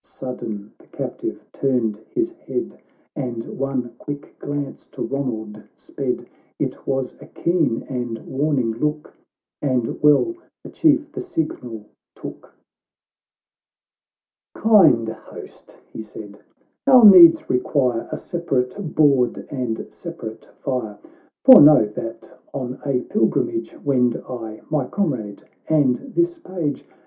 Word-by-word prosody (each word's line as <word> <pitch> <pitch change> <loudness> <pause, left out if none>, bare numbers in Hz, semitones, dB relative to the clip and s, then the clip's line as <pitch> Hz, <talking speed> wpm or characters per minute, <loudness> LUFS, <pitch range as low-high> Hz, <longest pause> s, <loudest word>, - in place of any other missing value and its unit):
"— - - -67
Sudden 110 -5 -7
the - - -21
captive - - -5
turned 125 -6 0
his 345 0 -1
head, 340 +2 -5 0.4
And 120 -5 -4
one 130 -3 -2
quick 145 0 -7
glance 145 -1 -5
to - - -6
Ronald 110 -6 -4
sped. - - -4 0.3
It - - -4
was 135 -2 -1
a - - -11
keen 165 -9 0
and 120 -3 -4
warning 135 -4 0
look, 150 +6 -3 0.5
And 130 -5 -1
well 150 - +4 0.3
the - - -10
Chief 305 -1 +2
the 380 - -5
signal 220 - -4 0.3
took. - - -10 1.4
" - - -71
Kind 175 - +5
host," 110 0 -12 0.2
he - - -6
said, 105 -1 -11 0.2
" - - -46
our 255 -4 +8
needs 170 -5 +9
require 125 -2 0
A - - -3
separate 165 0 -3
board 135 -6 +3
and 125 -5 -3
separate 130 -11 -8 0.2
fire; 120 -7 -3 0.5
For 260 -1 +11
know, 150 -6 +8
that 115 +2 -8 0.2
on 130 -1 -4
a 135 -3 0
pilgrimage 340 - -1
"Wend 125 -4 +2
I, 115 -4 -7
my 145 -5 0
comrade, 125 - -2 0.3
and 145 -6 +3 0.2
this 345 0 +1
page. 175 - -4
135 Hz, 125 wpm, -21 LUFS, 115-165 Hz, 1.4 s, For